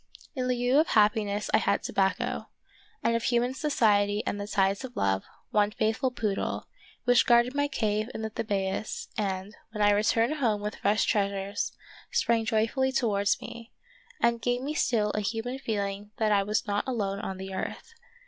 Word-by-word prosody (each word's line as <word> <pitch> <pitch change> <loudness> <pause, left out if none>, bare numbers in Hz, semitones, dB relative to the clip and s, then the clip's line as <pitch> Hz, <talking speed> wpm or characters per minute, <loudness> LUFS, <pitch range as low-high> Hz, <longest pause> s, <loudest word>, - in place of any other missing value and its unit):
In 255 -2 -1
lieu 250 +2 +3
of 315 - +3
happiness 210 -1 +2
I - - +6
had 200 0 +1
tobacco, 195 -1 -1 0.5
and 230 - +2
of 230 - 0
human 240 +2 +1
society 210 -7 +2
and 205 - -2
the 205 - -5
ties 195 +1 +1
of 255 -2 -8
love, 95 -1 +1 0.3
one 205 -1 +3
faithful 220 +5 0
poodle, 215 -5 -2 0.4
which 245 -1 +4
guarded 240 +1 +5
my 285 0 +1
cave 215 -4 -1
in 220 - -4
the 220 - -3
Thebais 200 -1 -2
and, 195 -1 -3
when 210 -2 -2
I 205 - +6
returned 225 +7 +2
home 225 -7 +1
with 210 0 -4
fresh 210 +2 +2
treasures, 200 0 -1 0.4
sprang 230 -1 +1
joyfully 230 +5 +1
towards 205 -6 +1
me, 235 0 -9 0.5
and 235 0 +2
gave 245 +1 0
me 290 +2 -2
still 220 -8 +1
a 210 - -1
human 230 +5 -3
feeling 205 -4 -3
that 215 -1 +1
I 200 -1 +4
was 210 +2 0
not 205 +2 -1
alone 200 -6 -1
on 190 -1 -4
the 190 0 -7
earth. 325 - -5
215 Hz, 175 wpm, -28 LUFS, 205-240 Hz, 0.5 s, I